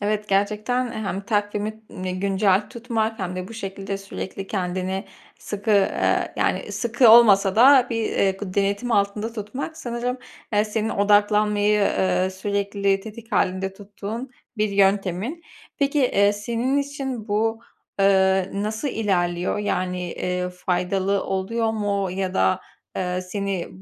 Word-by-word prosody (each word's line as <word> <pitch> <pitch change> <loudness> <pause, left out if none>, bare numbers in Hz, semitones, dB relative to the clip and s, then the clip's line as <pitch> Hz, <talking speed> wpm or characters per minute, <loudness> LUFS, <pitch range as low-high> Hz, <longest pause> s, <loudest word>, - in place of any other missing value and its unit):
Evet, 210 +1 -1
gerçekten 215 +5 0
hem 205 -4 -3
takvimini 205 -2 -3
güncel 195 +1 +2
tutmak 225 -2 -2
hem 185 -1 -4
de 185 0 -5
bu 230 - -10
şekilde 195 -2 -5
sürekli 195 0 -6
kendini 185 0 -2 0.3
sıkı, 205 +1 -4
eee, 200 -2 +2
yani, - - -1
sıkı 240 +1 +3
olmasa 205 -4 +6
da 255 +1 +7
bir, 225 -1 -1
eee, 195 - +2
gı 190 -1 -6
denetim 200 +4 0
altında 205 +2 0
tutmak 240 +9 -5
sanırım, 245 0 -3 0.3
eee, 210 0 +3
senin 220 0 -2
odaklanmayı, 210 0 +3
eee, 140 - +1
sürekli 200 0 -1
tetik 225 +3 -11
hâlinde 190 0 0
tuttuğun 210 +5 -7 0.3
bir 215 0 +1
yöntemin. 200 - +1 0.4
Peki, 280 0 +1
eee, 205 -6 +3
senin 235 +6 -1
için 270 -5 -4
bu, 225 +2 0 0.4
eee, 190 -1 +3
nasıl 215 +7 -2
ilerliyor? 180 -7 0
Yani, 180 -3 -2
eee, 180 0 -2
faydalı 185 +2 -1
oluyor 220 +4 -1
mu 200 -3 -1
ya 190 0 -3
da, 95 0 +2 0.4
eee, 180 0 -1
seni 195 0 -3
205 Hz, 130 wpm, -23 LUFS, 190-225 Hz, 0.4 s, da